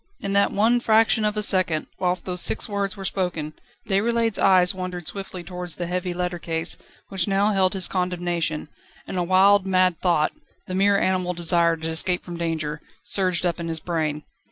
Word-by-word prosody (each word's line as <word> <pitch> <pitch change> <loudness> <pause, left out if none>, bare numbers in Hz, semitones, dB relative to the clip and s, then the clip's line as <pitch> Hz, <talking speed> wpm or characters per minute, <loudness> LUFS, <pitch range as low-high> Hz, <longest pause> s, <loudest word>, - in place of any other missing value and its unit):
In 195 - -3
that 200 0 +3
one 225 +4 +3
fraction 225 -1 +3
of 210 0 0
a 210 - +1
second, 185 -6 +1
whilst 180 0 0
those 180 -1 -1
six - - +1
words 200 -2 -2
were 195 - -6
spoken, 170 -6 -2 0.3
Déroulède's 225 +2 +1
eyes 185 -2 +4
wandered 180 -2 -5
swiftly 190 -1 -5
towards 180 -1 -6
the 175 - -4
heavy 180 +1 -2
letter 175 0 -3
case, 165 0 -1 0.3
which 190 -2 0
now 200 +2 +2
held 190 -2 +2
his 190 -2 +1
condemnation, 175 -4 -2 0.4
and - - -6
a 180 - 0
wild, 190 +2 +4
mad 185 -3 +2
thought 170 -4 +2 0.3
the 185 - -6
mere 200 +2 +3
animal 185 -2 0
desire 170 0 +2
to 160 0 -5
escape 175 +2 0
from 175 - -7
danger 160 -3 -3 0.2
surged 185 -2 +1
up 175 0 -1
in 170 - -4
his 165 -1 -2
brain. 155 -3 -2
180 Hz, 185 wpm, -23 LUFS, 170-195 Hz, 0.4 s, eyes